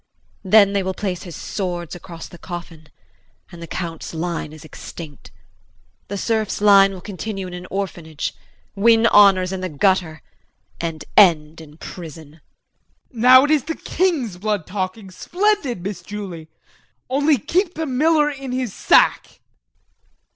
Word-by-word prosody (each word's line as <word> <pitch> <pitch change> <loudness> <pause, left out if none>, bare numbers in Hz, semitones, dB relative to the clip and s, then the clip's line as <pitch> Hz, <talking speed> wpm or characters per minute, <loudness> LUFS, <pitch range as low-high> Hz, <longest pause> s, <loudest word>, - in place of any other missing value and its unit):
Then 200 +1 +5
they 200 - +1
will 190 0 -3
place 185 -3 -3
his 175 -5 -9
swords 175 -4 -4
across 170 -1 -9
the 175 - -14
coffin 170 -3 -9 0.6
and 170 - -11
the 170 - -7
Count's 165 -2 -6
line 165 -2 -3
is 155 0 -12
extinct. 155 -2 -10 0.8
The 200 - -4
serf's 220 0 -1
line 200 -1 +6
will 185 -2 -9
continue 195 0 -5
in 180 - -8
an 180 +1 -8
orphanage, 170 -6 -4 0.4
win 225 +2 +4
honors 195 -4 +5
in 190 -1 -4
the 185 - -3
gutter 160 0 0 0.6
and 160 -3 -4
end 165 -5 +4
in 150 -1 -14
prison. 160 -4 -10 0.8
JEAN. 230 - -7
Now 255 +2 +8
it 295 - +1
is 300 -5 +2
the 325 - -3
king's 305 - -1
blood 205 -3 -2
talking. 190 +1 -5
Splendid, 350 - -1
Miss 195 -2 -5
Julie! 185 -4 -7 0.6
Only 285 +3 +2
keep 355 - -1
the 320 - -2
miller 300 +3 +2
in 270 -2 -7
his 255 -5 -2
sack. - - +3
190 Hz, 145 wpm, -21 LUFS, 170-230 Hz, 0.8 s, Now